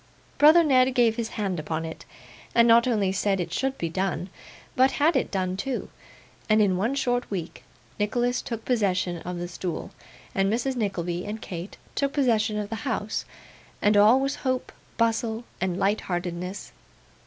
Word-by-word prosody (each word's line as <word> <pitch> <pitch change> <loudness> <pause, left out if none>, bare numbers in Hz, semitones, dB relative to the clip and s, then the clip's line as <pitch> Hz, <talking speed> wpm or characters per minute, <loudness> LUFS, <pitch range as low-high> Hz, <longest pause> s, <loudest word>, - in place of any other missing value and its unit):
Brother 315 +4 +8
Ned 260 -3 +4
gave 235 -2 +4
his 230 -1 -2
hand 195 -5 -1
upon 160 +1 -3
it, 160 - -8 0.5
and 235 0 +6
not 235 +1 +6
only 210 -6 +1
said 195 0 0
it 175 -1 -3
should 270 +5 -1
be 170 - -2
done, 185 +1 -2 0.4
but 260 +1 +4
had 310 +3 +3
it 265 - +1
done 185 -2 -1
too; 250 +6 -3 0.6
and, 215 0 +5
in 200 -3 +3
one 225 +9 0
short 245 -2 0
week, 170 -9 -5 0.4
Nicholas 240 +4 0
took 230 -2 -6
possession 185 -7 +1
of 180 +1 -5
the 175 0 -4
stool, 175 -1 -5 0.4
and 195 +1 +1
Mrs. 250 +4 0
Nickleby 180 -6 -2
and 215 +2 -4
Kate 175 -1 -7 0.2
took 280 -1 -1
possession 225 -6 +2
of 205 -1 -3
the 225 - -2
house, 220 -2 -2 0.5
and 210 +1 +3
all 215 +5 +6
was 275 +1 -1
hope, 255 -2 -2 0.3
bustle, 230 0 0 0.2
and 185 -1 0
light 200 +3 +1
heartedness. 180 +1 -4
210 Hz, 170 wpm, -26 LUFS, 185-245 Hz, 0.6 s, Brother